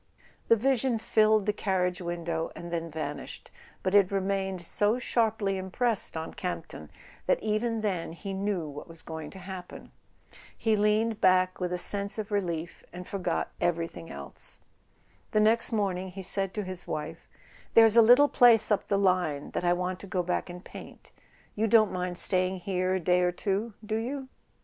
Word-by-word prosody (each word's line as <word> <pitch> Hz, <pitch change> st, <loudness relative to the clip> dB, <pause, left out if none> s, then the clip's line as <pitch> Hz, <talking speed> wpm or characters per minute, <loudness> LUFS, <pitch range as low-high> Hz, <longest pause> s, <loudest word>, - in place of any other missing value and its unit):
The 230 Hz, -, +6 dB
vision 255 Hz, +1 st, +1 dB
filled 215 Hz, -1 st, +3 dB
the 210 Hz, -, +1 dB
carriage 185 Hz, -3 st, -1 dB
window 170 Hz, -1 st, -3 dB
and 170 Hz, 0 st, -8 dB
then 165 Hz, 0 st, -2 dB
van¬ 145 Hz, -2 st, -4 dB
ished; -, -, -10 dB, 0.3 s
but 185 Hz, -, 0 dB
it 200 Hz, -2 st, +5 dB
remained 195 Hz, -1 st, -1 dB
so 210 Hz, +6 st, +1 dB
sharply 220 Hz, -5 st, 0 dB
impressed 200 Hz, +1 st, -1 dB
on 160 Hz, -, -5 dB
Camp 180 Hz, -3 st, -4 dB
ton 75 Hz, -, -10 dB, 0.4 s
that -, -, +3 dB
even 220 Hz, +1 st, 0 dB
then 185 Hz, -6 st, -2 dB
he 195 Hz, +3 st, -6 dB
knew 195 Hz, -4 st, -2 dB
what 145 Hz, 0 st, -8 dB
was 165 Hz, -1 st, -10 dB
going 160 Hz, -2 st, -7 dB
to -, -, -12 dB
happen. 185 Hz, -1 st, -9 dB, 0.7 s
He 220 Hz, -2 st, +2 dB
leaned 210 Hz, +1 st, +1 dB
back 185 Hz, 0 st, +3 dB
with 180 Hz, -1 st, -2 dB
a 180 Hz, -, -1 dB
sense 200 Hz, +3 st, -1 dB
of 215 Hz, -1 st, -5 dB
relief, 170 Hz, -5 st, -3 dB
and 180 Hz, 0 st, -9 dB
forgot 195 Hz, -2 st, -2 dB
every¬ 170 Hz, -1 st, 0 dB
thing 85 Hz, -1 st, -10 dB
else. 70 Hz, 0 st, -6 dB, 0.7 s
The 215 Hz, -, +4 dB
next 225 Hz, +3 st, +3 dB
morning 190 Hz, -4 st, -1 dB
he 190 Hz, +1 st, -8 dB
said 195 Hz, +1 st, -1 dB
to 210 Hz, -, -2 dB
his 185 Hz, -1 st, -6 dB
wife: 150 Hz, -1 st, -5 dB, 0.5 s
"There's 225 Hz, -1 st, +7 dB
a 235 Hz, -, +9 dB
little 245 Hz, +6 st, +7 dB
place 235 Hz, -5 st, +5 dB
up 210 Hz, -, +1 dB
the 200 Hz, -, +1 dB
line 180 Hz, -7 st, +1 dB
that -, -, -3 dB
I 175 Hz, 0 st, +3 dB
want 180 Hz, +1 st, -2 dB
to 200 Hz, -, -10 dB
go 185 Hz, -1 st, -1 dB
back 180 Hz, +1 st, -2 dB
and 175 Hz, +1 st, -9 dB
paint. -, -, -12 dB, 0.4 s
You 220 Hz, +2 st, 0 dB
don't 220 Hz, -2 st, +5 dB
mind 180 Hz, -1 st, -3 dB
staying 185 Hz, 0 st, +1 dB
here 185 Hz, 0 st, 0 dB
a -, -, 0 dB
day 180 Hz, +1 st, +2 dB
or 180 Hz, 0 st, +2 dB
two, 200 Hz, +4 st, -2 dB
do 215 Hz, +1 st, -1 dB
you 260 Hz, +4 st, -4 dB
190 Hz, 185 wpm, -28 LUFS, 180-215 Hz, 0.7 s, a